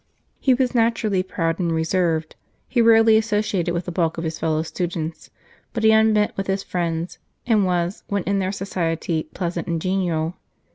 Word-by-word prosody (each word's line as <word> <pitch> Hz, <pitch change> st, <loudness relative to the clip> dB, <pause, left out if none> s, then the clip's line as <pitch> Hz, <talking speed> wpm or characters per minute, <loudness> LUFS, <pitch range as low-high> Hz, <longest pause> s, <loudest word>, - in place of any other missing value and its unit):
He 260 Hz, -2 st, +3 dB
was 255 Hz, 0 st, 0 dB
naturally 225 Hz, -5 st, +2 dB
proud 165 Hz, -2 st, -2 dB
and 170 Hz, -2 st, 0 dB
reserved, 160 Hz, -1 st, 0 dB, 0.3 s
he 240 Hz, -, +2 dB
rarely 225 Hz, -1 st, +6 dB
associated 210 Hz, -5 st, 0 dB
with 170 Hz, 0 st, -2 dB
the 180 Hz, -, -4 dB
bulk 165 Hz, -2 st, 0 dB
of 165 Hz, -, -3 dB
his 160 Hz, -1 st, -4 dB
fellow 160 Hz, -1 st, 0 dB
students; 165 Hz, -2 st, -4 dB, 0.4 s
but 225 Hz, -2 st, -2 dB
he 220 Hz, -, +6 dB
unbent 220 Hz, -1 st, +3 dB
with 195 Hz, -, -3 dB
his 195 Hz, 0 st, -1 dB
friends, 170 Hz, -1 st, -3 dB, 0.3 s
and 215 Hz, -5 st, +3 dB
was, 175 Hz, +1 st, -1 dB
when 200 Hz, -2 st, -1 dB
in 200 Hz, +2 st, 0 dB
their 190 Hz, 0 st, -1 dB
society, 165 Hz, -5 st, -2 dB
pleasant 175 Hz, -2 st, -3 dB
and 170 Hz, -1 st, -1 dB
genial. 175 Hz, -2 st, -1 dB
180 Hz, 175 wpm, -22 LUFS, 165-210 Hz, 0.4 s, rarely